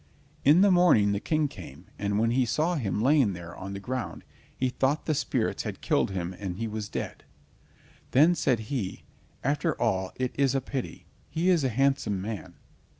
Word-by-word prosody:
In 150 +6 +6
the 200 0 +6
morning 175 - +5
the 100 - 0
King 155 +5 +1
came, 85 - -11
and 100 0 0
when 115 +2 +2
he 130 +2 +3
saw 155 +9 +1
him 110 - -1
lying 135 -5 +4
there 85 -1 -8
on 95 +1 -7
the 100 - -5
ground, 110 -5 -4 0.3
he 130 - +1
thought 135 +4 0
the 155 - +1
spirits 140 - -1
had - - -5
killed - - +1
him 90 -2 -3
and 95 -3 -4
he 115 - -2
was 105 -1 -5
dead. - - -5 0.9
Then 155 +7 +5
said 130 -9 +1
he: 110 -10 -3 0.4
"After 145 +3 0
all 95 -5 0
it 130 -1 -2
is 135 -1 +3
a - - +3
pity—he 140 +6 -4
is 170 -5 +3
a 130 - +2
handsome 135 -5 +1
man." 95 -3 -6
125 Hz, 185 wpm, -27 LUFS, 100-145 Hz, 0.9 s, In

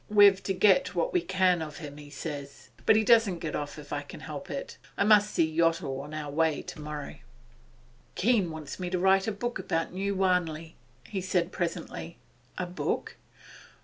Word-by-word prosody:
We've 205 -2 +7
to 195 - -1
get 210 +8 +4
what - - 0
we 360 - +3
can 185 - +2
of 155 -2 -6
him, 145 -3 -8
he 145 -1 -11
says. 140 -3 -7 0.2
But - - +7
he 220 - +4
doesn't 225 -5 +4
get 160 -2 -4
off 145 -1 -4
if - - -8
I - - -1
can - - -11
help - - -7
it. - - -6 0.2
I - - +3
must 210 0 +5
see 165 - +3
Yottle 165 -5 +1
on 145 +2 -9
our 155 -2 -5
way 160 0 +1
tomorrow.' 150 -1 -7 1.0
'Keene 210 -4 +2
wants 155 0 -7
me 180 -1 -3
to 180 - 0
write 190 +2 +3
a - - +1
book 240 +4 -3
about 165 +1 -2
New 200 +2 -1
Wanley,' 170 -4 0 0.3
he 195 - -3
said 180 -1 0
presently. 170 -1 -4 0.4
'A 180 - -1
book? 180 +1 -3
180 Hz, 185 wpm, -29 LUFS, 155-200 Hz, 1.0 s, We've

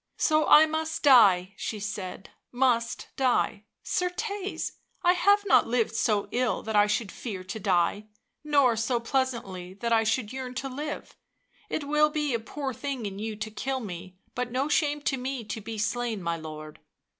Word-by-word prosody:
" - - -45
So 310 0 +3
I 310 - +8
must 315 0 -3
die," 200 -9 +6
she 215 - -4
said 200 -2 -6
— - - -49
" - - -58
must 235 -2 0
die. 245 -5 +1 0.2
Certcs! 400 +2 -2 0.3
I 355 0 +5
have 405 +3 +4
not 390 - +5
lived 230 -2 +1
so 215 -2 +1
ill 250 -1 0
that 220 0 -3
I 205 0 +5
should 210 0 -1
fear 195 -7 -6
to 200 +4 -6
die, 185 +3 +1 0.4
nor 285 -5 +4
so 235 +2 0
pleasantly 230 -8 -2
that 235 +3 -1
I 225 0 +4
should 220 +1 -1
yearn 255 -1 -5
to 270 +1 -3
live; 295 +4 -6 0.5
it 310 - -2
will 300 +1 +3
be 300 -3 -1
a 230 - +1
poor 265 +4 -5
thing 265 -1 -4
in 195 -1 -5
you 220 0 -4
to 215 +1 -5
kill 265 +5 -2
me, 185 -4 -8 0.2
but 245 0 -3
no 260 +3 0
shame 295 -1 +1
to 270 - 0
me 260 -1 -4
to 220 +1 -5
be 220 +1 -6
slain, 225 -1 -1
my 170 0 0
lord." 155 -1 -9
235 Hz, 190 wpm, -27 LUFS, 210-280 Hz, 0.5 s, I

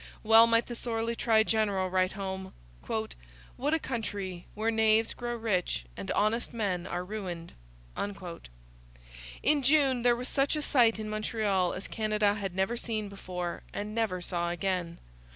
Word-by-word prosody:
Well 225 +1 +8
might 230 0 +3
the 240 - -6
sorely 230 -1 -2
tried 220 -2 +3
general 205 -4 +1
write 185 0 +2
home: 190 -1 -5 0.3
'What - - -4
a - - +3
country, 200 - -4
where 220 +2 +1
knaves 220 0 +3
grow 240 0 -4
rich 195 - -1
and 95 - -6
honest 225 +3 +1
men 190 -6 -1
are 180 +1 -3
ruined!' 180 -5 -5 1.9
In 295 -1 +4
June 270 -2 +4
there 240 0 +4
was 250 +2 -4
such 275 +2 +1
a 300 - -2
sight 235 -7 +4
in 215 -1 -4
Montreal 215 -4 0
as 190 - -5
Canada 215 -2 +1
had 195 -3 -4
never 190 +5 +1
seen 215 -3 -3
before, 180 -3 -5
and 210 +1 -4
never 210 -6 -1
saw 175 -1 -1
again. 175 -1 -2
215 Hz, 150 wpm, -30 LUFS, 185-230 Hz, 1.9 s, Well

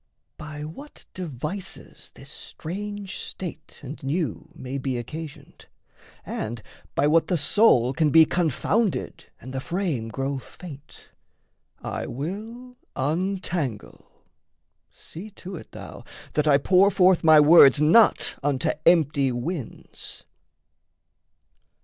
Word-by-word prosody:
By 150 -1 -7
what 275 - -11
devices 175 +2 -6
this - - -11
strange 200 +3 -7
state 165 -4 -8
and 140 +3 -8
new 145 - -3
May 130 +2 -5
be 130 -2 -2
occasioned, 155 +5 -9 0.6
and 110 0 -5 0.3
by 140 - +2
what 160 +2 +3
the 180 - +1
soul 140 - +4
Can 160 -1 +2
be 160 +2 +7
confounded 180 - -1
and 130 +2 -10
the 130 - -3
frame 165 - -2
grow 135 +3 -3
faint, 150 +1 -13 0.7
I - - -4
will 220 - -7 0.2
untangle: 165 - -3 0.8
see 185 +7 -11
to 190 +1 -8
it, 160 - -11
thou, - - -10 0.3
that 150 0 +1
I 140 -2 +6
Pour 185 +7 +4
forth 185 -3 +3
my 155 -1 +7
words 145 -3 +7
not 170 +9 +4
unto 140 -3 0 0.2
empty 145 -5 +4
winds. 130 +3 -6
155 Hz, 115 wpm, -24 LUFS, 140-185 Hz, 0.8 s, be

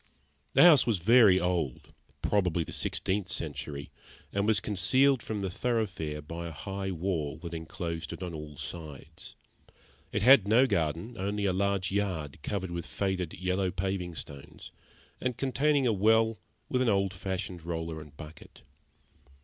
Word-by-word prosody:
The - - +7
house 155 -8 +8
was 115 -4 +2
very 105 0 +6
old 85 -8 -2 0.3
probably 90 -5 +1
the - - -9
sixteenth 95 -1 -1
century 75 -5 -5 0.4
and 100 +1 +1
was 110 -2 +3
concealed 125 +6 +3
from 110 -2 -4
the 95 - -1
thoroughfare 95 -10 -2
by 85 +3 -6
a - - -6
high 95 +4 -4
wall 85 -5 -2
that 85 -1 -8
enclosed 80 0 -5
it 85 +2 -6
on 90 -2 -5
all 75 -2 -8
sides. 80 -4 -7 0.8
It 105 0 -1
had 120 -4 +7
no 115 +5 +6
garden, 85 - -1
only 100 +2 -1
a 95 - +2
large 100 0 0
yard, 90 -8 -2
covered 95 0 -3
with 85 -2 -4
faded 90 +3 -2
yellow 90 +1 0
paving 90 -2 -3
stones, 70 -2 -9 0.5
and 125 -2 -1
containing 140 +1 +2
a 115 - +3
well 110 +2 +3 0.3
with 125 - 0
an 125 - +3
old 100 -2 +1
fashioned 90 -2 -4
roller 80 -1 -4
and 75 -1 -14
bucket. 80 0 -12
95 Hz, 155 wpm, -29 LUFS, 80-105 Hz, 0.8 s, house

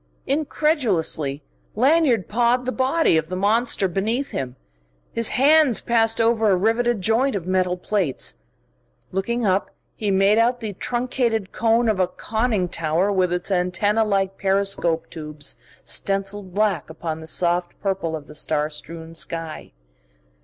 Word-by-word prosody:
Incredulously 235 - 0 0.3
Lanyard 260 - +3
pawed 240 +3 +1
the 255 - -1
body 265 - +2
of 160 0 -2
the 185 - -3
monster 205 +1 +2
beneath 220 +9 -1
him. 130 -2 -4 0.6
His 230 -1 +1
hands 285 0 +4
passed 225 -1 +1
over 225 -1 +3
a 190 - +4
riveted 225 +3 +1
joint 230 +6 +2
of 185 -4 -3
metal 185 -1 +1
plates. 180 - -1 0.7
Looking 235 +5 -1
up, 190 0 +1 0.3
he 210 - -2
made 195 +3 +4
out 240 +2 +2
the 220 -3 -5
truncated 240 -2 -1
cone 230 +1 +2
of 215 -4 +1
a 185 - +3
conning 220 0 -1
tower 165 +3 0
with 185 -3 +1
its 180 +3 -2
antennae 190 +4 +1
like 195 -3 0
periscope 195 -4 +1
tubes 150 -2 -5 0.3
stencilled 195 -1 -2
black 210 -4 +1
upon 160 0 -5
the 160 - -10
soft 175 +1 -1
purple 190 -5 -2
of 150 -2 -8
the 150 - -13
star 150 0 -1
strewn 160 +2 -9
sky. 165 -1 -4
200 Hz, 145 wpm, -22 LUFS, 175-230 Hz, 0.7 s, hands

